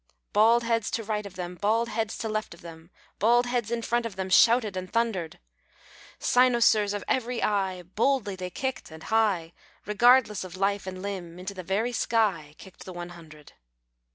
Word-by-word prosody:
Bald 225 Hz, +3 st, +5 dB
heads 230 Hz, -2 st, 0 dB
to 225 Hz, -, -3 dB
right 210 Hz, -1 st, -3 dB
of 190 Hz, -, -14 dB
them, 180 Hz, 0 st, -5 dB
Bald 215 Hz, +5 st, 0 dB
heads 220 Hz, -1 st, -3 dB
to 225 Hz, -, -4 dB
left 215 Hz, -4 st, -3 dB
of -, -, -19 dB
them, 165 Hz, -1 st, -12 dB, 0.3 s
Bald 240 Hz, +4 st, +4 dB
heads 245 Hz, -3 st, -1 dB
in 235 Hz, 0 st, -2 dB
front 240 Hz, +1 st, 0 dB
of 210 Hz, -, -11 dB
them 190 Hz, -1 st, -4 dB
Shouted 225 Hz, 0 st, +5 dB
and 185 Hz, 0 st, -5 dB
thundered; 220 Hz, -8 st, -1 dB, 0.8 s
Cynosures 235 Hz, -5 st, +3 dB
of 205 Hz, -, -4 dB
every 245 Hz, -2 st, -1 dB
eye, 190 Hz, -3 st, 0 dB
Boldly 210 Hz, +3 st, 0 dB
they 185 Hz, -1 st, -5 dB
kicked 260 Hz, +8 st, -4 dB
and 160 Hz, 0 st, -12 dB
high, 200 Hz, -7 st, +1 dB, 0.3 s
Regardless 220 Hz, 0 st, +4 dB
of 185 Hz, 0 st, -9 dB
life 195 Hz, 0 st, 0 dB
and 185 Hz, 0 st, -6 dB
limb. 180 Hz, -4 st, -6 dB
Into 185 Hz, +2 st, -6 dB
the 185 Hz, -, -7 dB
very 200 Hz, +7 st, -1 dB
sky 195 Hz, -11 st, 0 dB
Kicked 190 Hz, -, -13 dB
the 185 Hz, -, -8 dB
one 175 Hz, 0 st, -7 dB
hundred. 155 Hz, -4 st, -14 dB
205 Hz, 180 wpm, -27 LUFS, 185-230 Hz, 0.8 s, Bald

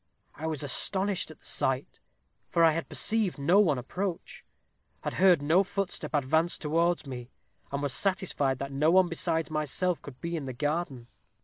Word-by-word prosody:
I 160 Hz, +3 st, -5 dB
was 155 Hz, -3 st, -2 dB
astonished 190 Hz, +8 st, +1 dB
at 155 Hz, -, -12 dB
the -, -, -22 dB
sight, 130 Hz, +1 st, -1 dB, 0.5 s
for 170 Hz, -, +2 dB
I 165 Hz, -, +6 dB
had 165 Hz, +1 st, -4 dB
perceived 215 Hz, -6 st, +2 dB
no 165 Hz, +8 st, +3 dB
one 160 Hz, -10 st, +3 dB
approach 175 Hz, +8 st, -5 dB, 0.6 s
had -, -, -4 dB
heard 180 Hz, -6 st, +4 dB
no 165 Hz, +6 st, +4 dB
footstep 195 Hz, -4 st, -3 dB
advance 160 Hz, +5 st, +1 dB
towards 165 Hz, +2 st, 0 dB
me, 125 Hz, -3 st, -7 dB, 0.4 s
and 140 Hz, +1 st, -3 dB
was 140 Hz, -3 st, 0 dB
satisfied 185 Hz, -9 st, 0 dB
that 140 Hz, +1 st, -5 dB
no 145 Hz, +3 st, +2 dB
one 185 Hz, +1 st, +5 dB
besides 165 Hz, -2 st, -1 dB
myself 155 Hz, +4 st, 0 dB
could 135 Hz, -3 st, -11 dB
be 170 Hz, 0 st, -4 dB
in 155 Hz, -4 st, -4 dB
the 130 Hz, -, -5 dB
garden. 145 Hz, -2 st, -2 dB
160 Hz, 175 wpm, -28 LUFS, 140-180 Hz, 0.6 s, I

